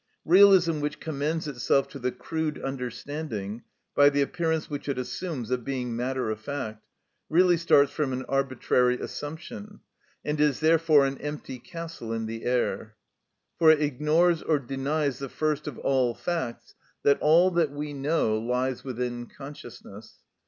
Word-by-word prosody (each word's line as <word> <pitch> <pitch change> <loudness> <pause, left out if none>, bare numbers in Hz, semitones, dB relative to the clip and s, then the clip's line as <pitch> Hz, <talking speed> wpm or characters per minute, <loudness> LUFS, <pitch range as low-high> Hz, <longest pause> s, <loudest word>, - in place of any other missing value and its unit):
Realism 180 -3 +6
which 150 +1 -3
commends 155 +1 -2
itself 135 0 +1
to 140 - -9
the 125 0 -1
crude 155 +5 -3
understanding, 125 -4 -5 0.3
by 145 0 +6
the 145 0 +2
appearance 160 +1 -1
which 145 -1 -5
it 135 - -1
assumes 130 -2 -4
of 125 -1 0
being 125 -3 -3
matter 125 -1 -1
of 110 - -4
fact, 110 -3 -5 0.5
really 175 +2 +5
starts 145 -4 +4
from 145 -2 -1
an 130 0 -3
arbitrary 130 -2 +1
assumption, 205 +8 -7 0.5
and 150 0 -1
is 150 -3 +2
therefore 160 -2 +4
an 135 0 -3
empty 145 -3 -6
castle 160 -2 -7
in 115 0 -2
the 115 +1 -6
air, 120 -3 -1 0.6
for 165 -2 +6
it 155 -1 +6
ignores 155 +4 +2
or 155 - +2
denies 140 +2 -2
the 135 -1 -5
first 150 +1 -1
of 145 - -5
all 130 -3 +1
facts, 165 -9 -4 0.3
that 140 - +4
all 170 +5 +5
that 170 -3 +2
we 145 +1 -5
know 135 -6 +1
lies 125 +2 -1
within 120 -2 -4
consciousness. 120 -6 -11
140 Hz, 150 wpm, -27 LUFS, 125-155 Hz, 0.6 s, Realism